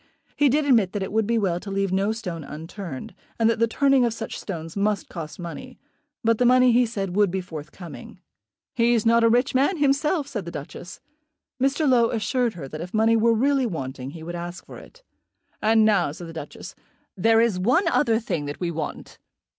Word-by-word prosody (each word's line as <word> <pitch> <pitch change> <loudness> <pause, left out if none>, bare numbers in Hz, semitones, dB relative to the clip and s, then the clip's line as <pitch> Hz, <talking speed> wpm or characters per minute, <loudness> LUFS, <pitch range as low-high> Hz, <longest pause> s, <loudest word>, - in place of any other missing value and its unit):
He 290 -1 +4
did 295 +3 +2
admit 225 -9 +3
that 205 -2 -2
it - - -5
would 220 0 +1
be 230 0 +1
well 185 -5 0
to 200 - -9
leave 195 -1 -1
no 195 +3 +1
stone 180 -8 -5
unturned, 160 0 -8 0.2
and 225 - +3
that 230 -1 +1
the 230 - +3
turning 275 +2 +3
of 235 -2 0
such 225 - -6
stones 165 -4 -6
must 205 0 0
cost 160 -3 -7
money; 250 +9 -8 0.5
but 230 -1 +2
the - - +3
money, 255 0 +5
he 240 +1 +4
said, 195 -5 -4
would 205 -1 +4
be 190 +2 -2
forthcoming. 170 0 -9 0.5
"He's 235 -1 +2
not 230 0 +4
a 230 - +5
rich 245 +4 +2
man 280 +8 +2
himself," 290 +2 +1
said 225 -10 -5
the - - -5
Duchess. 170 +3 -9 0.6
Mr. 275 +3 +2
Low 240 -3 +4
assured 235 +1 0
her 150 -6 -7
that 155 +3 -7
if 180 +4 -6
money 225 +1 +4
were 230 +1 +3
really 270 +2 +2
wanting 135 - -5
he 160 +2 -10
would 170 +2 -6
ask 175 +1 -6
for - - -11
it. - - -17 0.6
"And 220 0 +4
now," 195 -8 +3
said 170 +4 -9
the 165 - -9
Duchess, 150 -3 -8 0.4
"there 225 +4 +4
is 225 -5 +2
one 255 - +2
other 230 -5 +2
thing 175 -10 -3
that 145 0 -6
we 175 -2 -2
want. 155 -2 -6
215 Hz, 210 wpm, -24 LUFS, 175-240 Hz, 0.6 s, money